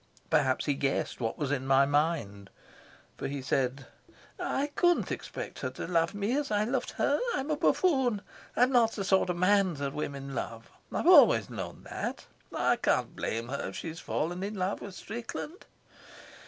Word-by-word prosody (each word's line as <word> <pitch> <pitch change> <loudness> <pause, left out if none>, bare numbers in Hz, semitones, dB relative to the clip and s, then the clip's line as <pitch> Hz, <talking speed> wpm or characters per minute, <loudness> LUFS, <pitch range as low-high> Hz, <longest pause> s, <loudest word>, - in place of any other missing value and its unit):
Perhaps 140 -5 +2
he 145 - +2
guessed 135 -1 -1
what 115 -1 -2
was 145 -2 -2
in 135 -2 -1
my 135 0 +5
mind, 140 - 0 0.7
for - - -3
he 140 0 -4
said: 135 0 -1 0.5
"I 285 +2 -1
couldn't 350 -4 +2
expect - - -6
her - - -2
to - - -6
love 165 +1 +1
me 205 +5 0
as 290 -1 -1
I 210 0 +2
loved 250 +5 -1
her. - - +1 0.2
I'm 285 +2 -2
a - - +2
buffoon. 265 - +2 0.3
I'm 250 +2 +4
not 235 -3 +4
the 200 - -3
sort 190 -1 +3
of 175 - -1
man 190 -1 +3
that 140 -1 -3
women 140 -2 -4
love. 115 -2 -5 0.2
I've - - -2
always - - +7
known - - -6
that. - - -5 0.3
I - - +2
can't - - 0
blame 115 +2 -3
her 140 - -3
if 95 - -10
she's 165 0 -6
fallen 175 +4 -2
in 205 +2 -3
love 190 +1 -2
with 200 -2 -8
Strickland." 240 - -7
170 Hz, 180 wpm, -30 LUFS, 140-220 Hz, 0.7 s, always